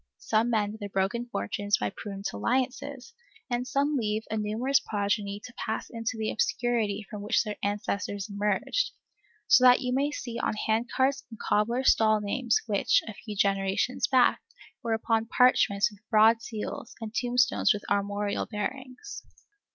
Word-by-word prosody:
Some 220 - +1
mend 215 -2 0
their 205 -2 -5
broken 200 +6 -1
fortunes 205 -4 -1
by 105 -1 -2
prudent 200 -2 -5
alliances, 265 +1 -2 0.4
and 245 +1 -1
some 285 +3 +1
leave 215 -3 -1
a 220 - -1
numerous 225 +6 +1
progeny 205 -2 -2
to 245 - -11
pass 220 -2 -4
into 225 0 -3
the 220 -1 -1
obscurity 235 - 0
from 210 -3 -7
which 205 - +2
their 210 -2 -5
ancestors 205 0 -2
emerged; 210 - -1 0.5
so 450 - +6
that 250 0 +7
you 250 -1 -1
may 275 +3 +1
see 240 -5 -5
on - - -1
handcarts 245 +6 0
and 225 - -10
cobblers' 235 +5 +2
stalls 215 -1 +2
names 235 +3 0
which, 205 -4 +2
a 220 - -5
few 210 +1 -8
generations 195 +4 +1
back, 255 -2 +4 0.4
were 230 -1 -1
upon 225 0 0
parchments 215 -4 +3
with 205 - -16
broad 220 +1 +5
seals, 220 0 -6
and 225 -1 -6
tombstones 245 +1 +2
with 210 -3 -1
armorial 205 0 -1
bearings. 255 - -6
220 Hz, 155 wpm, -28 LUFS, 205-250 Hz, 0.5 s, that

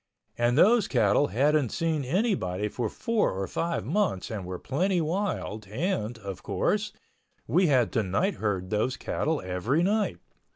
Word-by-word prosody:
And 120 +2 +1
those 220 +5 +5
cattle 120 +3 +3
hadn't 145 +1 +2
seen 160 0 -1
anybody 130 - 0
for 115 0 -2
four 230 - 0
or 95 +1 -2
five 170 - -2
months 170 - 0
and 100 -4 -4
were 90 0 -4
plenty 180 - 0
wild 160 - -2
and, 120 - -2
of 100 -4 -7
course, 210 - 0 0.5
we 180 0 +3
had 130 -6 +3
to 115 - +1
nightherd 100 - -1
those 110 +5 0
cattle 155 -1 -1
every 105 - 0
night. 205 - +1
130 Hz, 150 wpm, -27 LUFS, -, 0.5 s, those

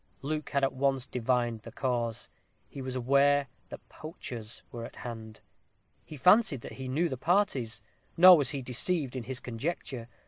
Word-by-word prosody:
Luke 150 +1 -3
had 140 -1 0
at 135 - +2
once 135 -1 0
divined 120 -2 -1
the 115 - -10
cause; 120 -3 -2 0.4
he 140 - -9
was 130 0 -5
aware 140 +3 +3 0.2
that - - -10
poachers 120 - -8
were 120 -1 -6
at - - -9
hand. 110 -2 -8 0.6
He 155 - -10
fancied 180 - +4
that - - -9
he 130 - -4
knew 155 +7 +1
the 130 - -4
parties; 130 - 0 0.3
nor 180 +1 +10
was 145 -5 +2
he 140 -3 -3
deceived 135 +2 0
in 125 -3 -4
his 130 -1 -5
conjecture. 125 -1 -5
130 Hz, 170 wpm, -29 LUFS, 120-145 Hz, 0.6 s, nor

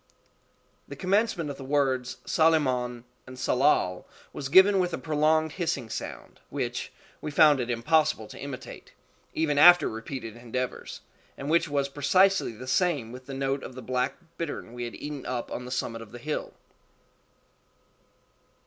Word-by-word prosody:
The - - -8
commencement 190 -5 0
of 140 - -8
the 135 - -8
words 130 -2 0
_Tsalemon_and 130 -7 +2 0.3
Tsalal 125 -9 +1 0.3
was 135 -2 -5
given 190 +5 +7
with 180 -2 0
a - - -6
prolonged 155 0 +1
hissing 145 - -3
sound, - - -7
which - - -3 0.3
we 150 - -4
found 150 -1 +5
it 125 -1 -2
impossible 120 0 +2
to - - -10
imitate, 140 -2 -8 0.4
even 150 -3 +1
after 175 +3 +8
repeated 115 0 -6
endeavors, 125 +2 -5 0.4
and 140 +2 -4
which 165 -1 +3
was 140 -1 0
precisely 165 +3 +3
the 125 +4 -9
same 140 -5 +1
with 125 +1 -11
the 135 - -6
note 135 0 -1
of 125 - -8
the 130 - -8
black 125 +1 -1 0.2
bittern 150 -7 -5
we 120 0 -4
had 120 - -7
eaten 145 -2 -6
up 125 -2 -3
on 125 - -5
the - - -7
summit 115 -2 -3
of 110 -2 -11
the 120 - -8
hill. 150 +5 -4
140 Hz, 155 wpm, -27 LUFS, 125-155 Hz, 0.4 s, after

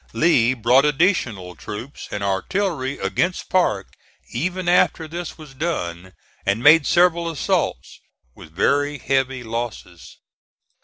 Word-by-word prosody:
Lee 130 -7 +3
brought 125 +3 +4
additional 135 - 0
troops 110 - -8
and 105 -1 -4
artillery 135 - -1
against 180 +1 -1
Parke 110 - +1 0.4
even 180 +1 -3
after 175 -2 +3
this 170 +2 -6
was 155 -4 -12
done, 95 - -4 0.3
and 100 +4 0
made 150 0 +7
several 170 -1 +3
assaults 140 - -2 0.3
with 80 - -14
very 145 - +1
heavy 135 -1 -1
losses. 115 -6 -6
135 Hz, 115 wpm, -21 LUFS, 105-170 Hz, 0.4 s, made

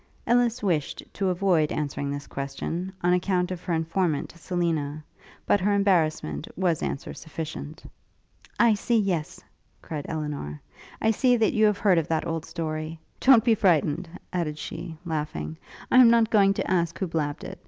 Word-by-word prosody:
Ellis 240 0 +2
wished 165 -7 -1
to 195 -2 0
avoid 180 -4 +2
answering 145 -1 -2
this 140 0 -4
question, 150 +7 -4
on 175 0 +4
account 180 0 +1
of 180 -2 -5
her 180 - -2
informant, 165 -1 -1
Selina; 165 -4 -2 0.4
but 205 - +3
her 205 +2 +2
embarrassment 160 - +1
was 175 -4 +1
answer 135 - -4
sufficient. 160 -1 -7 0.8
'I 235 -2 +6
see 230 +3 +1
yes!' 185 -7 -1 0.4
cried 150 -3 -5
Elinor, 150 - -4 0.4
'I 220 - +4
see 245 +3 +3
that 225 -2 +2
you 215 0 +4
have 210 -1 +1
heard 195 -4 +4
of 160 - -3
that 160 -1 0
old 165 -1 -3
story. 155 0 -4 0.2
Don't 260 -4 +6
be 235 -2 +4
frightened,' 175 -5 +2 0.2
added 160 -4 -2
she, 160 +1 -7
laughing, 150 - -3 0.4
'I - - +5
am 245 -2 +9
not 230 -1 +4
going 195 -2 +4
to - - -2
ask 170 -2 +1
who 190 - -1
blabbed 160 0 -2
it. 190 +1 -8
170 Hz, 165 wpm, -26 LUFS, 155-195 Hz, 0.8 s, am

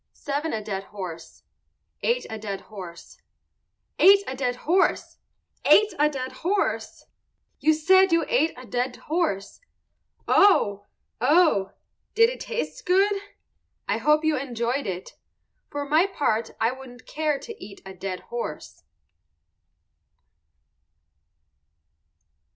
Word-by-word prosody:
_ - - -27
Seven 290 +3 -3
a 215 -1 -3
dead 195 -2 -4
horse. 180 -6 -9 0.6
Eight 485 +1 0
a 220 - -6
dead 200 -2 -5
horse. 185 -5 -11 0.8
Eight 395 +1 +7
a 260 - -5
dead 250 -2 -1
horse! 345 +9 0 0.4
Ate 425 -1 +5
a 300 +1 +4
dead 260 -3 -5
horse! 395 +4 -2 0.5
You 315 0 +3
said 375 +4 +4
you 335 0 +3
ate 405 -10 +2
a 255 - -10
dead 245 +1 -2
horse. 310 - -2 0.7
Oh! 205 - +4 0.3
oh! 285 - +3 0.4
Did 460 +2 +5
it - - -8
taste 485 +1 -4
good? 390 +3 +4 0.7
I - - 0
hope 300 +1 +3
you 315 -1 +3
enjoyed 245 0 -2
it. 185 -1 -6 0.5
For 285 0 -4
my 315 +6 +4
part 230 - -1
I 225 +2 +2
wouldn't 255 -1 -12
care 305 -2 -1
to 450 +9 -10
eat 200 - -11
a 190 - -8
dead 185 0 -5
horse. 235 -10 -6
275 Hz, 120 wpm, -25 LUFS, 215-350 Hz, 0.8 s, Eight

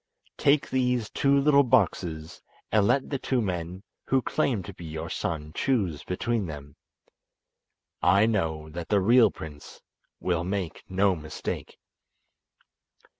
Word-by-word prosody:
Take 145 0 +3
these 125 -4 0
two 140 0 +3
little 140 0 +5
boxes 90 - 0 0.3
and 105 -1 +4
let 135 +5 +1
the 140 - -1
two 130 -1 0
men 90 -2 -3 0.2
who 135 -2 +2
claim 125 -10 0
to 100 - -9
be 85 - -12
your 80 0 -6
son 75 -2 -3
choose 95 - 0
between 105 +2 -1
them. 70 -2 -9 1.3
I 100 +4 +5
know 80 -8 -1
that 85 +1 -6
the 105 - +4
real 115 +3 +5
prince 75 -5 -10 0.4
will 85 -2 0
make 95 -3 -3
no 95 0 +2
mistake." 80 -1 -6
95 Hz, 130 wpm, -27 LUFS, 80-125 Hz, 1.3 s, little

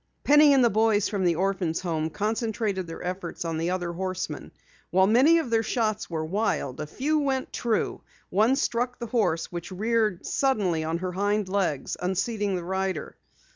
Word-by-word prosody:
Penny 295 0 +6
and 265 -3 +5
the 235 - +3
boys 215 -1 +3
from 200 -4 -1
the 170 -1 +3
orphans' 185 -2 -1
home 160 -3 -1
concentrated 210 -1 -2
their 165 - -7
efforts 180 -1 -4
on 165 -1 -2
the 165 +2 -1
other 180 -1 -2
horseman. 185 +1 -4 0.4
While 190 +1 +4
many 260 +11 +5
of 315 -8 -2
their 225 -1 +3
shots 220 -2 -1
were 160 -2 -2
wild, 180 - -1
a 150 - -4
few 300 - 0
went 270 -2 -1
true. 230 -3 -1 0.3
One 220 +7 +4
struck 245 -2 -1
the 240 - -5
horse 190 -9 0
which 175 +1 -6
reared 215 -1 0
suddenly 200 - +1
on 160 +1 -1
her 180 +1 -3
hind 205 +2 0
legs, 185 -8 -1
unseating 200 +2 -1
the 175 - -3
rider. 190 -3 -2
195 Hz, 175 wpm, -26 LUFS, 175-230 Hz, 0.4 s, Penny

